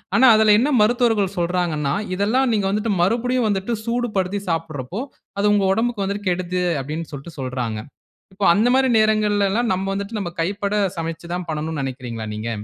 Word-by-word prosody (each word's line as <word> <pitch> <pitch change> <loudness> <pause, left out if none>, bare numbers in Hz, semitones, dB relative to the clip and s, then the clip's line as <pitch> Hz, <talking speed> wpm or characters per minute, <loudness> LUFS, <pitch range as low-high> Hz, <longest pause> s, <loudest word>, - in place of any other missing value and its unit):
ஆனா, 260 - +6
அதுல 215 -1 +5
என்ன 265 +5 +2
மருத்துவர்கள் 220 -4 +2
சொல்றாங்கன்னா, 170 -5 0 0.2
இதெல்லாம் 230 +7 +1
நீங்க 205 -3 +1
வந்துட்டு 210 +3 0
மறுபடியும் 240 +5 +1
வந்துட்டு 200 +3 -1
சூடுபடுத்தி 210 -5 -1
சாப்படுறப்போ 165 - -3 0.4
"அது 205 +1 +3
உங்க 205 -2 +2
உடம்புக்கு 230 -1 0
வந்துட்டு 200 +1 -3
கெடுது" 180 0 -1 0.2
அப்டின் 155 +4 -5
சொல்லிட்டு 145 +3 -9
சொல்றாங்க. 125 -4 -3 0.6
இப்போ 200 - -2
அந்த 220 +5 +3
மாதிரி 265 0 +3
நேரங்கள்ல 210 -2 +2
எல்லாம் 235 +2 +1
நம்ம 190 +1 -3
வந்துட்டு, 200 +3 -4
நம்ம 175 -3 -4
கைப்பட 200 +3 -2 0.2
சமைச்சு 165 +1 -5
தான் 180 -1 -4
பண்ணனும் 155 0 -3
நெனைக்கிறீங்களா 125 -4 -5
நீங்க? 110 +2 -4
195 Hz, 160 wpm, -21 LUFS, 165-215 Hz, 0.6 s, ஆனா